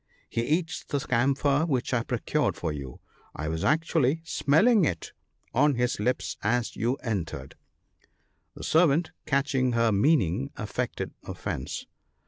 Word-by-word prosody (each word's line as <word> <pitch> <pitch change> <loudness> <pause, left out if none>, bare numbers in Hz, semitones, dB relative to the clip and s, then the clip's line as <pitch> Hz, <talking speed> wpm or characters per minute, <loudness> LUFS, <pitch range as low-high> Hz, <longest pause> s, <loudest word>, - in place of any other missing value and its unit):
he 115 - -1
eats 165 +7 -1
the 145 - -2
camphor 135 +3 +2
which 130 -4 -1
I 120 - +2
procured - - 0
for 80 - -3
you; 70 -4 -7 0.4
I 75 - -4
was 80 +1 -2
actually 160 -1 +2
smelling 195 +10 +4
it 85 - -1 0.4
on 145 +2 +4
his 125 -2 0
lips 125 +5 -1
as 120 +2 0
you 120 +5 0
entered." 80 - -3 1.0
The - - -9
servant 160 0 +3 0.2
catching 135 -3 +1
her 115 -1 +3
meaning, 100 - +2
affected - - -3
offence. 65 - -5
125 Hz, 130 wpm, -27 LUFS, 105-150 Hz, 1.0 s, smelling